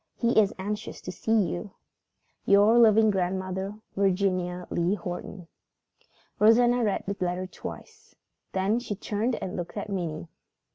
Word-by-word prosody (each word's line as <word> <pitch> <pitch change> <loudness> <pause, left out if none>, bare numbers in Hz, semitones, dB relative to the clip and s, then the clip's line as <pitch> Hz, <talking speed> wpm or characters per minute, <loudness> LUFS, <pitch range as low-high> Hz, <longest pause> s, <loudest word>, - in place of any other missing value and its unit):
He 235 -1 +3
is 205 -2 +3
anxious 205 +2 -5
to 180 - -6
see 220 +5 +1
you. 185 +3 -6 0.7
"Your 205 +4 +5
loving 220 -1 +6
grandmother, 190 +1 -2 0.2
"VIRGINIA 185 -2 0
LEE 175 +3 +1
HORTON." 180 -1 -7 0.9
Rosanna 240 +3 +5
read 205 -3 0
the 200 - -3
letter 180 +1 -2
twice. 445 - -10 0.4
Then 195 +5 +1
she 225 -4 -5
turned 220 +4 -1
and 185 - -5
looked 175 +3 -6
at 205 - -4
Minnie. 170 -4 -3
200 Hz, 135 wpm, -27 LUFS, 185-220 Hz, 0.9 s, loving